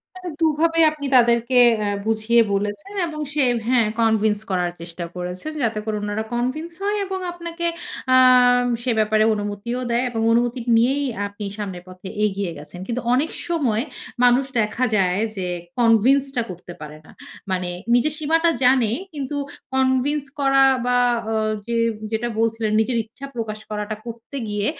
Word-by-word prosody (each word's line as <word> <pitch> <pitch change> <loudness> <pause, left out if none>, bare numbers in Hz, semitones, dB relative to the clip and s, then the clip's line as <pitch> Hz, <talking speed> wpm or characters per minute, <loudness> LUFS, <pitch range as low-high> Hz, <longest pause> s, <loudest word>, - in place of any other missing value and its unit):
তাহলে 365 -1 -7
দুভাবে 325 +1 +2
আপনি 295 -2 -6
তাদেরকে 235 +1 +3 0.2
অ্যা 210 - -1 0.2
বুঝিয়ে 225 +1 +3
বলেছেন 205 - -3
এবং 305 -2 -6
সে 295 -1 +1 0.3
হ্যাঁ। 240 -4 +3
কনভেন্স 220 -2 +2
করার 180 -2 0
চেষ্টা 170 +1 -6
করেছেন। 180 +11 -5
যাতে 230 -2 0
করে 215 -1 -2
উনারা 210 +1 -2
কনভেন্স 260 +8 -2
হয় 410 +1 +1
এবং 380 0 -3
আপনাকে 340 0 -5 0.5
আম 250 -1 +6 0.2
সে 250 - 0
ব্যাপারে 215 0 +3
অনুমতিও 205 +4 -4
দেয়। 235 +2 +1
এবং 225 -2 -3
অনুমতি 240 +2 +1 0.2
নিয়েই 270 +5 +2 0.2
আপনি 205 +1 -8
সামনের 190 -4 -5
পথে 185 +1 -10 0.2
এগিয়ে 200 -2 -2
গেছেন। 180 +4 -11
কিন্তু 245 +1 -2
অনেক 290 +5 +1 0.2
সময় 255 -10 +1 0.4
মানুষ 245 +2 +5 0.2
দেখা 215 +4 0
যায় 185 -1 +2 0.2
যে 185 - -3 0.3
কনভিন্সটা 245 +3 +3
করতে 180 0 -9
পারে 150 0 -9
না। - - -15 0.4
মানে 180 -1 -1 0.2
নিজের 280 +5 +3
সীমাটা 325 +2 +2
জানে 250 -4 +4 0.2
কিন্তু 285 0 -4 0.4
কনভিন্স 265 +2 +1 0.2
করা 270 -1 +4 0.2
বা 245 0 +3 0.3
অ - - 0 0.3
যে 235 0 -1 0.4
যেটা 225 +2 -1
বলছিলেন 225 -1 0
নিজের 240 +2 0
ইচ্ছা 250 +5 -10
প্রকাশ 220 -2 -4
করাটা, 210 0 -3
করতে 235 +4 -8
গিয়ে 205 0 -1
235 Hz, 150 wpm, -22 LUFS, 210-270 Hz, 0.5 s, আম